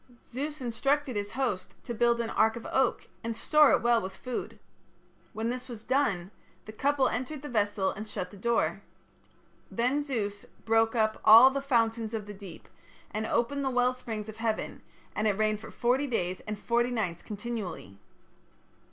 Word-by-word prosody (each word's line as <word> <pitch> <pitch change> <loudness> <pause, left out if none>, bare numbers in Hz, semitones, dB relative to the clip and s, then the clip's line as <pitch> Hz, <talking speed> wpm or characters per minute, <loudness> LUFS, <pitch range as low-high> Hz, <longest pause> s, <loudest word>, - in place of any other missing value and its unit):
Zeus 290 +3 -4
instructed 270 +3 0
his 205 +1 -3
host 230 -8 -2
to 240 - -4
build 235 +1 +2
an 230 -1 -2
ark 220 0 +3
of 235 - -8
oak, 265 -2 +1 0.2
and 230 0 -3
store 300 -2 +5
it - - +3
well 235 -1 +4
with 190 0 -6
food. 250 -1 -5 0.7
When 225 +1 -2
this 250 +1 -4
was 225 -3 -8
done, 200 -10 0 0.3
the 215 - -8
couple 275 +5 +2
entered 260 +5 -3
the 295 - -6
vessel 205 -4 +1
and 215 +3 -7
shut 180 -3 -5
the - - -12
door. 235 +4 0 0.9
Then 255 +5 +1
Zeus 210 -8 -3 0.2
"broke 225 +1 +3
up 220 -1 +1
all 235 +5 +9
the 275 +1 -2
fountains 230 -4 +1
of 215 -2 -4
the 205 - -8
deep, 195 -4 -11 0.4
and 215 +1 -2
opened 260 +4 0
the 265 - +1
well 250 0 +2
springs 225 -4 -6
of 220 0 -9
heaven, 225 -1 -2 0.3
and 215 - +1
it 200 -2 +1
rained 215 -1 +1
for 225 - -10
forty 255 +4 +1
days 185 -7 -1
and 210 0 -3
forty 235 +3 +1
nights 195 -9 -2
continually". 205 - -6
230 Hz, 180 wpm, -29 LUFS, 215-255 Hz, 0.9 s, all